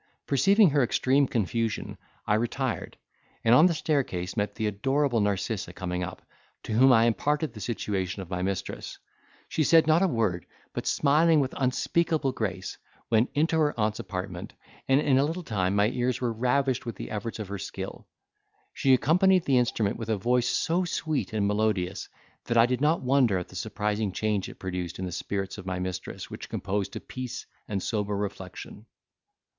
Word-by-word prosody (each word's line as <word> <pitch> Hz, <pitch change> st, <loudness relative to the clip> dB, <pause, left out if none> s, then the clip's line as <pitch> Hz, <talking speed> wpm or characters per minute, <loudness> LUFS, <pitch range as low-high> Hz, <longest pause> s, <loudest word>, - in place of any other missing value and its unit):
Perceiving 195 Hz, +6 st, +4 dB
her 145 Hz, 0 st, +3 dB
extreme 130 Hz, +3 st, +2 dB
confusion, 115 Hz, 0 st, -1 dB, 0.3 s
I -, -, +2 dB
retired, 120 Hz, +3 st, -2 dB, 0.5 s
and 115 Hz, -, +5 dB
on 155 Hz, +8 st, +8 dB
the 175 Hz, -, +1 dB
staircase 125 Hz, -, -1 dB
met 105 Hz, -2 st, -1 dB
the 110 Hz, -, -2 dB
adorable 130 Hz, +5 st, +1 dB
Narcissa 100 Hz, -2 st, -1 dB
coming 90 Hz, 0 st, -3 dB
up, -, -, -7 dB, 0.4 s
to -, -, -4 dB
whom 130 Hz, +4 st, +6 dB
I 115 Hz, -2 st, +6 dB
imparted 145 Hz, +4 st, 0 dB
the 110 Hz, -, -9 dB
situation 100 Hz, -3 st, -2 dB
of 90 Hz, -, -14 dB
my 90 Hz, 0 st, -2 dB
mistress; 95 Hz, 0 st, -4 dB, 0.5 s
she 155 Hz, -, 0 dB
said 165 Hz, +2 st, +5 dB
not 160 Hz, +2 st, +4 dB
a 195 Hz, -, +4 dB
word, 110 Hz, -, -1 dB, 0.3 s
but -, -, -4 dB
smiling 155 Hz, +2 st, +4 dB
with 135 Hz, -2 st, -1 dB
unspeakable 150 Hz, +3 st, +1 dB
grace, 95 Hz, -6 st, -4 dB, 0.3 s
went 115 Hz, +2 st, +3 dB
into 160 Hz, +2 st, +2 dB
her 150 Hz, -5 st, +1 dB
aunt's 110 Hz, 0 st, 0 dB
apartment, 90 Hz, -2 st, -5 dB, 0.3 s
and 135 Hz, +1 st, +4 dB
in 135 Hz, -3 st, +3 dB
a -, -, +4 dB
little 165 Hz, +5 st, -2 dB
time 100 Hz, -, 0 dB
my 105 Hz, +1 st, +3 dB
ears 125 Hz, 0 st, -1 dB
were 120 Hz, -2 st, -1 dB
ravished 125 Hz, +3 st, +1 dB
with 115 Hz, -2 st, -5 dB
the -, -, -7 dB
efforts 110 Hz, +2 st, -4 dB
of 110 Hz, -3 st, -6 dB
her 100 Hz, 0 st, -4 dB
skill. -, -, -7 dB, 0.7 s
She 135 Hz, -1 st, +4 dB
accompanied 180 Hz, +6 st, +3 dB
the 130 Hz, -3 st, +4 dB
instrument 115 Hz, -3 st, 0 dB
with 115 Hz, -1 st, -6 dB
a 110 Hz, -, +1 dB
voice 120 Hz, +4 st, +1 dB
so 175 Hz, +3 st, +1 dB
sweet 155 Hz, -6 st, -2 dB
and 105 Hz, -2 st, 0 dB
melodious, 100 Hz, -3 st, 0 dB, 0.4 s
that 120 Hz, -, 0 dB
I 115 Hz, -, +7 dB
did 125 Hz, +1 st, -1 dB
not 155 Hz, +1 st, +2 dB
wonder 125 Hz, -6 st, +3 dB
at 90 Hz, -, -5 dB
the -, -, -13 dB
surprising 105 Hz, +1 st, -2 dB
change 105 Hz, 0 st, -1 dB
it -, -, -12 dB
produced 90 Hz, -2 st, -4 dB
on 95 Hz, -, -2 dB
the 90 Hz, -, -4 dB
spirits 95 Hz, +3 st, -4 dB
of 95 Hz, -, -9 dB
my 90 Hz, 0 st, -2 dB
mistress 90 Hz, 0 st, -5 dB
which -, -, -8 dB
composed 100 Hz, 0 st, -2 dB
to -, -, -4 dB
peace 125 Hz, -2 st, -6 dB, 0.2 s
and 100 Hz, -3 st, -2 dB
sober 105 Hz, -2 st, -1 dB
reflection. 100 Hz, +2 st, -6 dB
115 Hz, 185 wpm, -27 LUFS, 100-135 Hz, 0.7 s, on